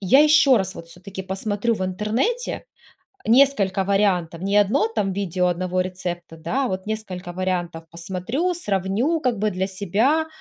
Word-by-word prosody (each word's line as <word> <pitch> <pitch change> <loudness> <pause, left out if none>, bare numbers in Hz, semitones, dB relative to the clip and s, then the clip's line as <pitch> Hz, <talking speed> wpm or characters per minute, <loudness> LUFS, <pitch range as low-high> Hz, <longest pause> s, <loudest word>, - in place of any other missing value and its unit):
я 225 +8 +5
еще 295 -4 +6
раз 190 -2 -1
вот 165 - -10
все-таки 190 +3 -8
посмотрю 205 +4 -1
в 190 - -3
интернете 220 - -1 0.6
несколько 220 -7 +4
вариантов, 185 -4 +1
не 200 +1 +1
одно 205 +2 +3
там 210 -4 -1
видео 185 -2 0
одного 185 +1 -1
рецепта, 175 -2 -5
да, 255 +12 -1
а - - -2
вот 190 +1 -4
несколько 190 -5 -5
вариантов 175 -2 -2
посмотрю, 190 - -2
сравню 210 - 0
как 250 -6 0
бы 210 +1 +1
для 190 0 -1
себя", 210 - +1
195 Hz, 155 wpm, -23 LUFS, 185-225 Hz, 0.6 s, еще